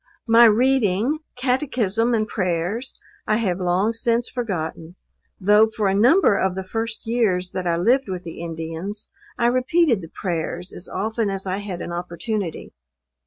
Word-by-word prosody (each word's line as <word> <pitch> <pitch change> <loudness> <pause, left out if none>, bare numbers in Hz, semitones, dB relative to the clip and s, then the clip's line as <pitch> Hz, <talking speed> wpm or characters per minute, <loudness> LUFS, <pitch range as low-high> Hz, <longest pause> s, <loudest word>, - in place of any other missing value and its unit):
My 230 +1 +7
reading, 235 +2 +3 0.2
Catechism 250 -3 +1
and 215 -1 0
prayers, 185 +5 -2 0.3
I 215 - +2
have 190 -6 -1
long 185 +5 +1
since 235 +1 0
forgotten; 175 -7 -4 0.4
though 210 +3 +5
for 220 -2 -1
a 190 - +2
number 240 - +5
of 190 -1 0
the 190 - -3
first 225 +3 -4
years 210 -6 0
that 185 -1 -3
I 170 -1 +1
lived 240 +7 +2
with 185 -1 -4
the 165 -1 -8
Indians, 165 +5 -6 0.3
I 235 - +1
repeated 255 - +2
the 165 - -10
prayers 175 0 -4
as 180 - -4
often 220 +2 -1
as 195 0 -4
I 185 0 -2
had 200 -4 -5
an - - -6
opportunity. 175 +2 -4
205 Hz, 160 wpm, -22 LUFS, 180-235 Hz, 0.4 s, My